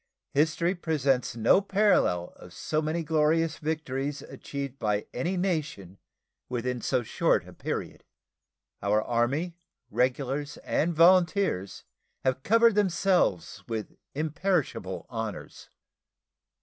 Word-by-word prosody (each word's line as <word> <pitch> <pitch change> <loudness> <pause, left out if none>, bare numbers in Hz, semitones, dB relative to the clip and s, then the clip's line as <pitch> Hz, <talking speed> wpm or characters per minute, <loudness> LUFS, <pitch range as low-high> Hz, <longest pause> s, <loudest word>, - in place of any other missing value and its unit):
History 160 +4 +2
presents 140 -9 0
no 115 - +4
parallel 195 - +2
of 90 - -13
so 155 0 -1
many 160 +2 -1
glorious 160 +1 +1
victories 145 -2 -3
achieved 140 -1 -7
by 105 -2 0
any 175 +9 -1
nation 155 - -2 0.5
within 125 0 -2
so 130 -2 0
short - - +1
a - - -12
period. - - -5 0.8
Our 100 +2 +2
Army, 140 +9 0 0.3
regulars 130 +5 -1
and 170 +1 0
volunteers, 175 - +3 0.4
have 130 0 +1
covered 230 +6 +5
themselves 185 - +1
with 110 -2 -4 0.2
imperishable 155 - -1
honors. 110 -4 -6
145 Hz, 105 wpm, -28 LUFS, 120-170 Hz, 0.8 s, covered